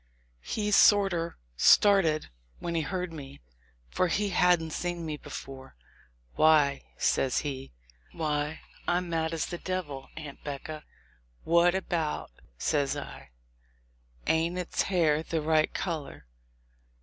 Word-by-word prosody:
He 210 Hz, -, -2 dB
sorter 195 Hz, -5 st, +4 dB, 0.2 s
started 165 Hz, -, +4 dB, 0.3 s
when 170 Hz, -, -4 dB
he 165 Hz, -, +1 dB
heard 180 Hz, +1 st, -3 dB
me, 140 Hz, -3 st, -9 dB, 0.5 s
for 185 Hz, -, +2 dB
he 200 Hz, +4 st, 0 dB
hadn't 175 Hz, -3 st, +3 dB
seen 175 Hz, 0 st, -3 dB
me 155 Hz, -1 st, -3 dB
before. 135 Hz, -2 st, -9 dB, 0.6 s
"Why," 150 Hz, -3 st, +4 dB
says 130 Hz, -, +1 dB
he, 135 Hz, -3 st, -5 dB, 0.5 s
"I'm 160 Hz, +3 st, -2 dB
mad 160 Hz, -1 st, 0 dB
as 165 Hz, -1 st, -1 dB
the 175 Hz, -, -6 dB
devil, 165 Hz, -8 st, -4 dB
Aunt 150 Hz, -3 st, -9 dB
'Becca 150 Hz, +2 st, -6 dB, 0.3 s
!" -, -, -36 dB
"What 170 Hz, +2 st, +4 dB
about?" 165 Hz, -, -2 dB, 0.3 s
says 140 Hz, -, 0 dB
I; -, -, -8 dB, 1.0 s
"ain't 165 Hz, +2 st, +1 dB
its 180 Hz, -1 st, -1 dB
hair 160 Hz, -5 st, +2 dB
the 165 Hz, 0 st, -2 dB
right 155 Hz, 0 st, +2 dB
color? 155 Hz, -, -4 dB
160 Hz, 120 wpm, -29 LUFS, 150-175 Hz, 1.0 s, sorter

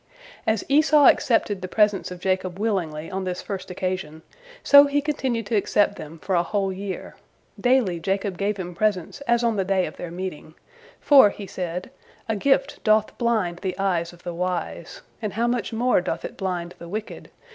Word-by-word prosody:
As 220 Hz, -2 st, +1 dB
Esau 300 Hz, +1 st, +5 dB
accepted 210 Hz, -7 st, +3 dB
the 185 Hz, -, -4 dB
presents 210 Hz, 0 st, +2 dB
of 180 Hz, -1 st, -8 dB
Jacob 185 Hz, -1 st, -1 dB
willingly 170 Hz, -8 st, -2 dB
on 190 Hz, 0 st, -3 dB
this 180 Hz, -1 st, -4 dB
first 195 Hz, -3 st, -6 dB
occasion, 180 Hz, -4 st, -4 dB, 0.4 s
so 285 Hz, 0 st, +8 dB
he 285 Hz, +1 st, +1 dB
continued 265 Hz, -6 st, -2 dB
to 220 Hz, -, -1 dB
accept 205 Hz, 0 st, +2 dB
them 155 Hz, -1 st, -9 dB
for 185 Hz, +4 st, -4 dB
a 175 Hz, -, +4 dB
whole 195 Hz, +1 st, -1 dB
year; 195 Hz, 0 st, -6 dB, 0.4 s
daily 245 Hz, -9 st, +2 dB
Jacob 195 Hz, +2 st, -1 dB
gave 200 Hz, +2 st, -1 dB
him 180 Hz, -2 st, -5 dB
presents 205 Hz, -, -1 dB
as 235 Hz, 0 st, +3 dB
on 230 Hz, -2 st, +1 dB
the 195 Hz, -, +1 dB
day 190 Hz, -1 st, +1 dB
of -, -, -8 dB
their 175 Hz, -, -6 dB
meeting, 170 Hz, -3 st, -7 dB, 0.4 s
for, 270 Hz, -7 st, +7 dB
he 200 Hz, 0 st, -8 dB
said, 180 Hz, -1 st, -5 dB, 0.4 s
"'A 220 Hz, -, -1 dB
gift 275 Hz, +5 st, +1 dB
doth 215 Hz, -1 st, +2 dB
blind 215 Hz, -8 st, 0 dB
the 185 Hz, -2 st, -4 dB
eyes 180 Hz, -4 st, 0 dB
of 175 Hz, 0 st, -18 dB
the 175 Hz, -, -5 dB
wise,' 180 Hz, 0 st, -4 dB, 0.2 s
and 215 Hz, -3 st, -3 dB
how 230 Hz, +3 st, 0 dB
much 240 Hz, 0 st, -1 dB
more 235 Hz, -2 st, +2 dB
doth 170 Hz, -2 st, -3 dB
it -, -, -7 dB
blind 180 Hz, -2 st, -3 dB
the 170 Hz, -, -9 dB
wicked! 215 Hz, +3 st, -6 dB
195 Hz, 190 wpm, -24 LUFS, 180-225 Hz, 0.4 s, so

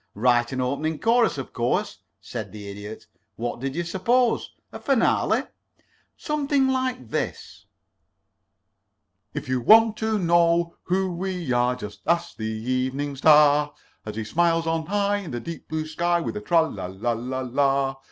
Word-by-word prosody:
"Write 120 Hz, +2 st, +2 dB
an 130 Hz, -, -3 dB
opening 140 Hz, +5 st, -1 dB
chorus, 230 Hz, -3 st, +2 dB
of 135 Hz, -, -6 dB
course," 120 Hz, +1 st, -1 dB, 0.2 s
said -, -, -7 dB
the 105 Hz, -1 st, -9 dB
Idiot. 105 Hz, +2 st, -8 dB, 0.3 s
"What 120 Hz, +1 st, -4 dB
did 135 Hz, +2 st, -4 dB
you 175 Hz, -, -1 dB
suppose? 230 Hz, +8 st, +1 dB, 0.2 s
A -, -, -8 dB
finale? 275 Hz, -5 st, +2 dB, 0.7 s
Something 285 Hz, -3 st, 0 dB
like 255 Hz, -, -2 dB
this: -, -, -4 dB, 1.7 s
"If -, -, -4 dB
you 130 Hz, -1 st, 0 dB
want 220 Hz, -, +6 dB
to 220 Hz, -1 st, 0 dB
know 170 Hz, -1 st, +2 dB
who 185 Hz, +1 st, 0 dB
we 180 Hz, -6 st, -3 dB
are, 120 Hz, +1 st, +2 dB
Just 105 Hz, -4 st, -9 dB
ask 170 Hz, 0 st, 0 dB
the 110 Hz, -, -5 dB
Evening 130 Hz, +5 st, -2 dB
Star, 150 Hz, 0 st, +5 dB, 0.3 s
As 105 Hz, -1 st, -7 dB
he 110 Hz, -, -3 dB
smiles 165 Hz, +7 st, +1 dB
on 165 Hz, -1 st, -1 dB
high 205 Hz, +1 st, +1 dB
In 200 Hz, -5 st, -7 dB
the 120 Hz, -, -4 dB
deep 165 Hz, +6 st, -8 dB
blue 155 Hz, 0 st, -3 dB
sky, 170 Hz, +2 st, 0 dB
With 170 Hz, -, -3 dB
his 210 Hz, 0 st, -7 dB
tralala 100 Hz, -, 0 dB
la 120 Hz, +3 st, 0 dB
la 125 Hz, +3 st, -3 dB
la. 135 Hz, +1 st, +1 dB
155 Hz, 155 wpm, -24 LUFS, 125-185 Hz, 1.7 s, want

